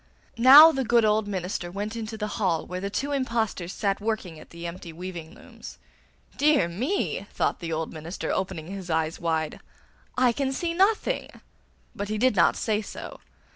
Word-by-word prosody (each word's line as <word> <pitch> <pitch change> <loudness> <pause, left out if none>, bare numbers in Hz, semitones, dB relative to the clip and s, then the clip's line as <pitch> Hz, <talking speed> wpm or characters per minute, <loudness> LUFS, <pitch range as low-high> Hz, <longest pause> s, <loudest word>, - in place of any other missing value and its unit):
Now 285 +6 +10
the 270 -3 -1
good 235 -1 +3
old 215 0 +2
minister 185 -2 -3
went 205 +4 -5
into 220 -1 -5
the 210 - -2 0.2
hall 170 -5 +1
where 180 0 -5
the 200 - -3
two 280 +8 -2
impostors 230 -9 -1
sat 200 -1 -1
working 205 -7 -3
at - - -14
the 170 0 -9
empty 170 0 -7
weaving 170 -1 -8
looms. - - -12 0.6
'Dear 295 - +4
me!' 245 - -2
thought - - -1
the 170 -2 -5
old 160 0 -3
minister, 160 +3 -5
opening 185 -4 -3
his 190 0 -7
eyes 160 0 -1
wide, 160 -2 -2 0.6
'I 250 -1 +4
can 270 +2 -1
see 335 +5 -2
nothing!' 415 +7 0 0.6
But 205 0 -4
he 215 - -1
did 255 0 +2
not 175 - +4
say 215 -1 0
so. - - -9
200 Hz, 175 wpm, -26 LUFS, 170-240 Hz, 0.6 s, Now